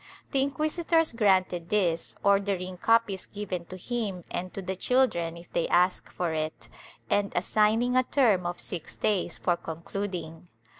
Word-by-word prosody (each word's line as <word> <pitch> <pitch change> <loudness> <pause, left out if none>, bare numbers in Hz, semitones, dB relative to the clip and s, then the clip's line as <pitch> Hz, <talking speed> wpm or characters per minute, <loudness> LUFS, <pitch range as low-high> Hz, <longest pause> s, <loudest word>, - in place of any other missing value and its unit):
The 270 - +2
inquisitors 310 +4 +1
granted 190 -6 +2
this, 175 -6 +1
order 200 0 +3
ing 185 0 -6
copies 225 -2 +2
given 185 -4 -5
to 185 - -9
him 200 -3 -3
and 180 +1 -3
to - - -3
the 190 +1 -3
children 180 -7 +1
if 170 0 -14
they 170 - +1
ask 180 +1 +2
for 175 -3 -2
it, 155 -6 -4 0.4
and 200 - +1
assigning 225 +4 +2
a 255 - +6
term 225 -9 +2
of 175 0 -4
six 175 -4 -7
days 205 -4 0
for 175 - +1
concluding. 170 0 -5
190 Hz, 155 wpm, -28 LUFS, 175-225 Hz, 0.4 s, a